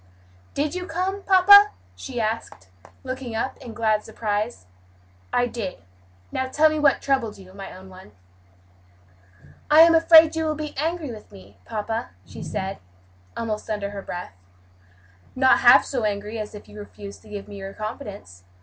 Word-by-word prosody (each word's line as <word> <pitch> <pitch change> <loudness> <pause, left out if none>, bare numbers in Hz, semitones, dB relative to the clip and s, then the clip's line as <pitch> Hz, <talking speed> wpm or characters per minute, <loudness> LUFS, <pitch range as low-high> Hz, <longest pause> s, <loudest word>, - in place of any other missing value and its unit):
"Did 295 +2 -1
you 365 0 -5
come, 370 +4 -2
papa?" 405 +2 +7 0.2
she 255 -3 -6
asked, 215 - -4 0.3
looking 255 -3 -6
up 260 +4 -2
in 230 -2 -10
glad 215 -2 +1
surprise. 215 - -3 0.7
"I 245 - +2
did. 225 -6 -5 0.5
Now 260 - -2
tell 305 +4 +3
me 310 - -2
what 290 -2 +3
troubled 265 -6 0
you, 185 -1 -15
my 195 0 -9
own 190 +1 -12
one?" 185 - -14 1.6
"I 305 +1 +8
am 335 0 +7
afraid 325 -1 +7
you 320 0 -1
will 310 -1 -1
be 305 0 -6
angry 315 -1 -2
with 215 -2 -12
me, 100 +1 -16
papa," 225 - -4 0.2
she - - -11
said, 190 +1 -4 0.6
almost 220 -2 -4
under 205 -2 -3
her 200 -1 -6
breath. 175 - -7 1.0
"Not 260 0 +4
half 245 +2 +7
so 255 -4 -3
angry 210 +1 -3
as 210 0 -6
if 205 - -11
you 210 - -12
refuse 205 -1 -10
to 215 - -18
give 205 -1 -7
me 205 -1 -10
your 195 0 -7
confidence. 205 - -8
225 Hz, 165 wpm, -23 LUFS, 205-300 Hz, 1.6 s, I